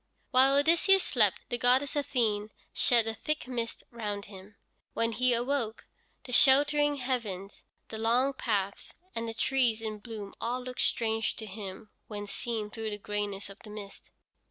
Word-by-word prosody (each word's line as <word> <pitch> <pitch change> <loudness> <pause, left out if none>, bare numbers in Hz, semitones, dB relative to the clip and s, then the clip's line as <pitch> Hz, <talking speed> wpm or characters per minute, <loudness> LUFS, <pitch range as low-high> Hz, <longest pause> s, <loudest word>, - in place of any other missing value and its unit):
While 265 +2 +6
Odysseus 340 +6 +5
slept 215 -7 +2
the 240 - -2
goddess 260 +4 +3
Athene 225 -7 0 0.2
shed 235 -2 +4
a 225 - -2
thick 305 +4 -3
mist 235 -3 -3
round 210 -4 -4
him. 200 +1 -12 0.4
When 230 0 +1
he 250 +2 +2
awoke, 240 -1 -1 0.4
the 260 - -9
sheltering 290 +3 +5
heavens, 230 -8 -3 0.3
the 220 - -6
long 245 +5 +2
paths, 200 -6 -2 0.2
and 230 0 -3
the 225 - -6
trees 245 -3 +2
in 215 -1 -5
bloom 210 -3 -8
all 245 +2 -2
looked 250 0 -4
strange 225 -1 +1
to 220 - -6
him 205 +1 -8 0.2
when 205 -1 -5
seen 215 0 -4
through 225 0 -4
the 205 - -4
grayness 205 -1 -3
of 195 +1 -12
the 215 - -13
mist. 210 -1 -9
230 Hz, 160 wpm, -30 LUFS, 210-255 Hz, 0.4 s, While